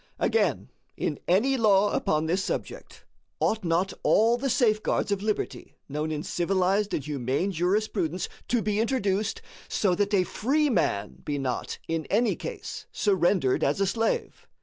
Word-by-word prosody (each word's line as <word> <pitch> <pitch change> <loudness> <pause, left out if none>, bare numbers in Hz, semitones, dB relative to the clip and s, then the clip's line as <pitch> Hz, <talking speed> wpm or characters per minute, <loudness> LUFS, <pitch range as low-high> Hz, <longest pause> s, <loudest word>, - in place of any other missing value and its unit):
Again, 455 - +1 0.3
in 150 - -2
any 240 +10 +3
law 205 -3 +4
upon 155 +1 +1
this 180 +4 0
subject, - - -5 0.3
ought 220 -1 +1
not 175 +3 +1
all 225 +3 +4
the 270 +3 -2
safeguards 215 -4 +1
of 200 -1 0
liberty 215 0 -3
known 150 +2 -3
in 150 -1 -3
civilized 190 +3 +1
and 140 - -4
humane 140 +5 -1
jurisprudence 180 -1 0 0.2
to 240 -2 +1
be 210 0 0
introduced, 220 -3 0 0.3
so 195 -4 +1
that 205 +3 +1
a 185 - +4
free 280 +10 +1
man 100 - -1
be 145 -1 -2
not, 130 -3 -3
in 165 -1 -2
any 230 +4 +2
case, - - -7
surrendered 175 - +2
as 145 +6 +1
a 195 - +3
slave? 225 +4 -1
195 Hz, 150 wpm, -27 LUFS, 165-215 Hz, 0.3 s, law